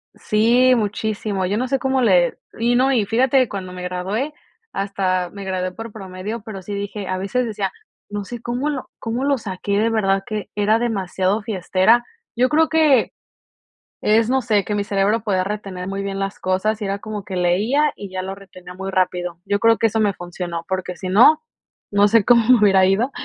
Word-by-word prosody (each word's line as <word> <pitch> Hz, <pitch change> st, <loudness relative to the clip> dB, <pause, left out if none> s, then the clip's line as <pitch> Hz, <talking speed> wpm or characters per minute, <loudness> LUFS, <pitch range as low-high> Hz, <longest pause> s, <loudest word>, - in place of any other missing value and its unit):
Sí, 240 Hz, +4 st, +3 dB
muchísimo. 210 Hz, -2 st, -2 dB
Yo 200 Hz, +3 st, -1 dB
no 255 Hz, +2 st, -1 dB
sé 270 Hz, +1 st, 0 dB
cómo 265 Hz, 0 st, +1 dB
le 180 Hz, -7 st, +3 dB, 0.2 s
y 240 Hz, +1 st, +2 dB
no, 260 Hz, +2 st, +3 dB
y 225 Hz, -6 st, +2 dB
fíjate 255 Hz, +5 st, +2 dB
que 255 Hz, -, +3 dB
cuando 190 Hz, -2 st, -6 dB
me 180 Hz, 0 st, -8 dB
gradué, 190 Hz, +11 st, -3 dB, 0.4 s
hasta 185 Hz, -2 st, -1 dB
me 200 Hz, -1 st, -8 dB
gradué 185 Hz, -1 st, -2 dB
por 225 Hz, +4 st, -8 dB
promedio, 195 Hz, +2 st, -6 dB
pero 205 Hz, -3 st, -8 dB
sí 205 Hz, +3 st, -7 dB
dije, 200 Hz, 0 st, -5 dB
a 185 Hz, -, -2 dB
veces 220 Hz, +7 st, -1 dB
decía, 205 Hz, -4 st, -2 dB, 0.4 s
no 205 Hz, -1 st, -4 dB
sé 240 Hz, +2 st, -7 dB
cómo 245 Hz, +5 st, -2 dB
lo 275 Hz, -4 st, -4 dB
cómo 230 Hz, +3 st, -3 dB
lo 280 Hz, -1 st, +2 dB
saqué, 200 Hz, -1 st, -2 dB
de 225 Hz, +2 st, +2 dB
verdad 195 Hz, -3 st, +1 dB
que 215 Hz, -1 st, -5 dB
era 210 Hz, +2 st, +2 dB
demasiado 195 Hz, -3 st, -1 dB
fiestera. 205 Hz, +2 st, +2 dB, 0.3 s
Yo 250 Hz, +2 st, +3 dB
creo 315 Hz, +1 st, +3 dB
que, 305 Hz, -6 st, +3 dB, 0.9 s
es 220 Hz, +2 st, +3 dB
no 265 Hz, +1 st, +2 dB
sé, 210 Hz, -5 st, +1 dB
que 210 Hz, -, -2 dB
mi 205 Hz, -, 0 dB
cerebro 200 Hz, +3 st, +1 dB
podía 190 Hz, -4 st, 0 dB
retener 195 Hz, -3 st, -5 dB
muy 195 Hz, 0 st, -3 dB
bien 195 Hz, 0 st, -4 dB
las 195 Hz, 0 st, -4 dB
cosas, 210 Hz, +4 st, 0 dB
y -, -, -2 dB
era 200 Hz, +1 st, -2 dB
como 215 Hz, -1 st, -6 dB
que 190 Hz, -2 st, -5 dB
leía 220 Hz, +12 st, +2 dB
y 200 Hz, -, -8 dB
ya 185 Hz, -, -3 dB
lo 190 Hz, +1 st, -5 dB
retenía 185 Hz, -2 st, -13 dB
muy 190 Hz, +1 st, -6 dB
rápido. 180 Hz, -2 st, -1 dB
Yo 205 Hz, -, 0 dB
creo 230 Hz, 0 st, +4 dB
que 225 Hz, -, +3 dB
eso 220 Hz, +1 st, -1 dB
me 205 Hz, -2 st, +2 dB
funcionó, 175 Hz, -1 st, -6 dB
porque 185 Hz, -1 st, -3 dB
si 185 Hz, +3 st, -6 dB
no, 240 Hz, +12 st, +6 dB, 0.5 s
no 205 Hz, 0 st, +4 dB
sé 225 Hz, -2 st, +4 dB
cómo 235 Hz, -2 st, +5 dB
me 250 Hz, -, +7 dB
hubiera 195 Hz, -2 st, +5 dB
ido. 215 Hz, +8 st, +1 dB
205 Hz, 205 wpm, -21 LUFS, 190-230 Hz, 0.9 s, me